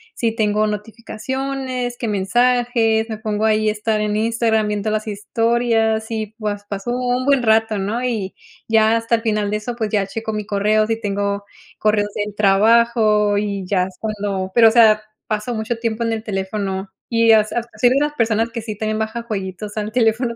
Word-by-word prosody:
si 225 -1 -1
tengo 215 -1 +1
notificaciones, 245 +4 -4
qué 235 - -2
mensajes, 230 +2 +2
me 220 - -4
pongo 215 -1 -1
ahí 215 0 +2
a - - +2
estar 215 0 -1
en 210 0 -1
Instagram 225 -1 +1
viendo 210 +1 -2
las 215 0 -2
historias 225 +1 0
y 220 -1 -4
pues, 205 -1 -3
pasó 200 +4 -4
un 250 0 0
buen 275 -3 +3
rato, 220 -1 +3
¿no? 215 +6 -2
Y 220 -6 -2 0.3
ya 220 0 +4
hasta 230 +1 +1
el 225 - -3
final 210 -2 0
de 210 - 0
eso, 235 +3 -5
pues 220 -3 -2
ya 200 -2 +1
checo 220 +2 -4
mi 210 -1 -3
correo, 215 +1 +1
si 225 0 -1
tengo 200 -1 -2 0.3
correos 210 -1 +1
del 205 -1 -3
trabajo 210 0 +3
y 200 -2 -2
ya 185 -2 +2
es 185 0 -7
cuando 200 -3 -3
pero, 230 -2 +7
o - - -1
sea, 220 -2 +6 0.3
paso 215 +3 -2
mucho 225 +1 -3
tiempo 230 0 -2
en 230 - 0
el 220 -1 -3
teléfono 195 -1 -3 0.2
y, 230 -1 +3
as 215 -1 +3
ah, 240 - 0
asi 245 - +3
mira, 295 +3 +1
personas 225 0 +1
que 230 -1 -5
sí 215 -2 -6
también 215 0 -2
baja 220 +2 -3
jueguitos 205 -1 -5
al 215 0 -2
teléfono 235 0 +1
220 Hz, 190 wpm, -20 LUFS, 210-230 Hz, 0.3 s, pero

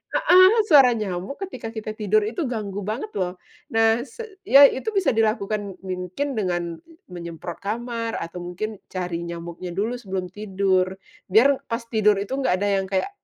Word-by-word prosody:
heeh. 370 +1 +7 0.2
Suara 270 -6 +7
nyamuk, 195 +4 -4
ketika 255 -11 -7
kita 215 -1 -5
tidur 215 0 +2
itu 275 +10 -3
ganggu 205 -4 -4
banget, 235 - -3
loh. 180 0 -2 0.4
Nah, 225 +1 +4
se 395 - -11
iya 280 +2 +9
itu 265 - -5
bisa 390 - +3
dilakukan, 215 -3 0
mungkin 185 +10 -3
dengan 175 -4 -2 0.3
menyemprot 170 -1 -7
kamar, 230 +2 -3
atau 170 +2 -6
mungkin 200 +4 -5
cari 180 -2 -3
nyamuknya 170 +1 -6
dulu, 220 +5 -1
sebelum 190 -4 -4
tidur. 190 -2 +1 0.4
Biar, 260 +8 +5
pas 230 - -2
tidur 215 -3 +3
itu 200 - -5
nggak 270 -9 +1
ada 205 - +1
yang - - -6
kayak, 190 - 0
210 Hz, 160 wpm, -23 LUFS, 185-235 Hz, 0.4 s, iya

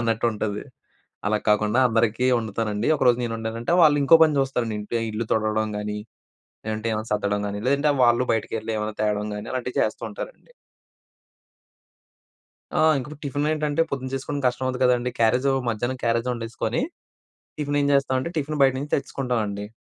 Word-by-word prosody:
అన్నట్టుంటది. 110 -2 -1 0.6
అలా 105 0 +2
కాకుండా 105 +3 +3
అందరికీ 115 +1 +1
వండుతానండి. 110 -1 -2
ఒకరోజు 125 -3 +3
నేను 115 -1 -3
వండానంటే 115 +5 -3
వాళ్ళు 150 -2 +6
ఇంకో 160 +4 +7
పని 155 -2 +1
చూస్తారండి 125 -5 -1
ఇంట్లో, 110 +3 -3
ఇల్లు 110 +2 -2
తుడవడం 110 0 +1
గానీ, 105 0 -3 0.7
లేదంటే 110 +1 -3
ఏవన్నా 110 +1 -4
సద్దడం 105 0 0
గానీ, 100 0 -4
లేదంటే 140 +2 +2
వాళ్ళు 120 +1 +4
బయటికెళ్లి 110 0 -3
ఏవన్నా 105 0 -3
తేవడం 105 0 0
గానీ 105 +1 -6
అలాంటివి 125 0 -3
చేసస్తూ - - -1
ఉంటారండి. - - -9 2.3
ఆ! - - +3 0.2
ఇంకిపుడు 150 +2 -6
టిఫిన్ 145 +2 -1
ఏంటంటే 155 0 +1
పొద్దున 130 -1 -3
చేసుకోవడం 140 +2 -3
కష్టం 125 +1 0
అవుద్ది 130 0 -2
కదండీ! 125 0 +2
క్యారేజ్ 125 +4 +3 0.2
మధ్యాహ్నం 120 +3 -2
క్యారేజ్ 115 +1 +1
వండేసుకొని. 115 - -2 0.8
టిఫిన్ 145 -1 -1
ఏం - - +2
చేస్తామంటే, 130 +2 +1
టిఫిన్ 150 0 -3
బయట 135 -1 +5
నుంచి 145 +2 -6
తెచ్చేసుకుంటామండి. 115 -8 -2
120 Hz, 150 wpm, -24 LUFS, 110-135 Hz, 2.3 s, ఇంకో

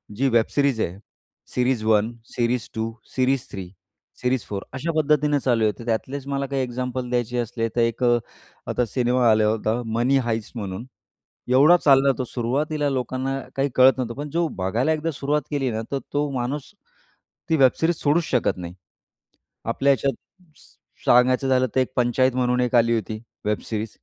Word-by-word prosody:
जी 135 +5 +1
web 115 -2 +3
series 140 -5 +2
आहे, 90 -1 -2 0.6
series 125 -2 +1
1, 110 0 +3 0.2
series 120 -1 0
2, 110 0 -2 0.2
series 130 0 +1
3, 95 -2 -6 0.5
series 125 -1 0
4, 100 -1 -5
अशा 145 +6 -2
पद्धतीने 150 -1 +2
चालू 120 -4 +1
आहे. 105 - +3
तर 115 - -8
त्यातलेच 130 +4 -3
मला 140 0 -1
काही 135 0 -2
एक्झाम्पल 125 0 -4
द्यायचे 125 0 -1
असले, 115 -1 -1
तर 120 - +2
एक 115 +2 0
अ, 120 -1 +4 0.5
आता 125 - 0
सिनेमा 125 +1 +2
आला 110 0 +3
होता 110 +2 0 0.2
Money 130 +3 +3
Heist 115 -2 -2
म्हणून, 100 0 -5 0.6
एवढा 140 +8 +6
चालला 140 -3 +5
तो, 130 - -1
सुरुवातीला 145 +5 -1
लोकांना 130 +1 -2 0.2
काही 135 +1 +1
कळत 130 +1 +7
नव्हतं, 120 -3 -3
पण 145 +1 -5
जो 170 +3 0
बघायला 110 +10 0
एकदा 160 +1 -2
सुरुवात 145 +1 -1
केली 140 -3 0
ना, 110 0 -2
तर 140 - 0
तो 145 0 0
माणूस 130 +7 -3 0.8
ती 160 - +3
वेब 130 -3 +6
सिरीज 165 +1 +2
सोडूच 155 +4 +2
शकत 125 -6 +1
नाही. 90 -1 -7 0.9
आपल्या 135 +5 +2
ह्याच्यात 135 +1 -1 0.4
स - - -20 0.3
सांगायचं 125 +2 +4
झालं 130 0 +3
तर, - - +4
एक 130 - +2
पंचायत 125 +1 +2
म्हणून 125 0 +1
एक 125 0 0
आली 115 0 +4
होती 110 0 -3 0.3
वेब 105 0 0
सिरीज. 110 0 -3
125 Hz, 175 wpm, -23 LUFS, 115-135 Hz, 0.9 s, कळत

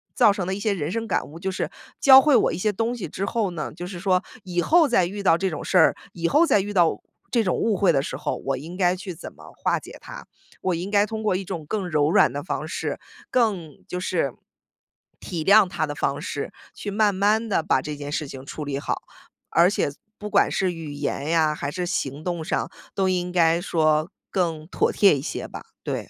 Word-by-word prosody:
造 210 - +6
成 185 -3 -3
了 190 - -1
一 205 - -6
些 205 0 +1
人 155 -5 -3
生 230 +3 -2
感 - - -1
悟， 155 - -11
就 190 +2 -2
是 185 - -2 0.3
教 270 -3 +9
会 295 -2 +4
我 225 - +4
一 165 - -3
些 210 +3 +1
东 230 +4 -1
西 215 - -5
之 195 - -3
后 210 -2 -1
呢， 160 -3 -4
就 175 +1 -6
是 180 -1 -7
说 185 -1 +2 0.2
以 175 -2 -1
后 320 - +5
再 230 -8 +3
遇 200 +3 -5
到 170 -4 +4
这 190 +1 0
种 155 - -5
事 185 - +2
儿， 160 - +6 0.2
以 170 -1 -1
后 315 +4 +5
再 210 -10 +3
遇 205 +1 -5
到 170 -4 +3 0.3
这 235 -2 +3
种 185 - 0
误 225 -2 +1
会 190 -1 +3
的 135 - +2
时 - - -5
候， - - -2
我 135 -1 0
应 165 +6 -8
该 180 -1 +3
去 185 0 -7
怎 165 - -9
么 - - -14
化 - - 0
解 - - -12
它。 - - -10 0.4
我 185 - 0
应 175 +4 -4
该 205 0 +4
通 220 +1 -5
过 205 -4 +2
一 195 - -2
种 175 -4 -6
更 195 -2 -2
柔 150 -2 +2
软 - - +5
的 145 - -4
方 - - -3
式， - - -3 0.3
更 195 - 0
就 180 - -4
是 170 -7 0 0.9
体 165 -3 -4
谅 200 +3 +6
他 175 -4 -1
的 145 - -5
方 140 +1 -1
式， 140 - -4 0.2
去 205 - -6
慢 210 0 +3
慢 210 +4 +2
地 175 - +2
把 130 - +2
这 150 +1 -5
件 145 0 -6
事 150 - -2
情 135 0 -9
处 150 - -6
理 140 -1 -3
好。 - - -3 0.5
而 170 +2 +5
且 145 - 0 0.3
不 210 - -6
管 - - +4
是 185 -2 +1
语 160 -3 -7
言 145 -1 -3
呀， 160 -2 +3
还 145 - -3
是 180 +1 -3
行 150 -5 -3
动 175 -3 -3
上， - - -1 0.2
都 190 -1 +2
应 180 -1 0
该 170 -1 +3
说 155 -2 +2 0.2
更 165 -4 -1
妥 - - +1
贴 195 -8 +5
一 135 - -4
些 155 - -4
吧， - - -9 0.2
对。 - - -4
180 Hz, 260 characters per minute, -24 LUFS, 155-205 Hz, 0.9 s, 教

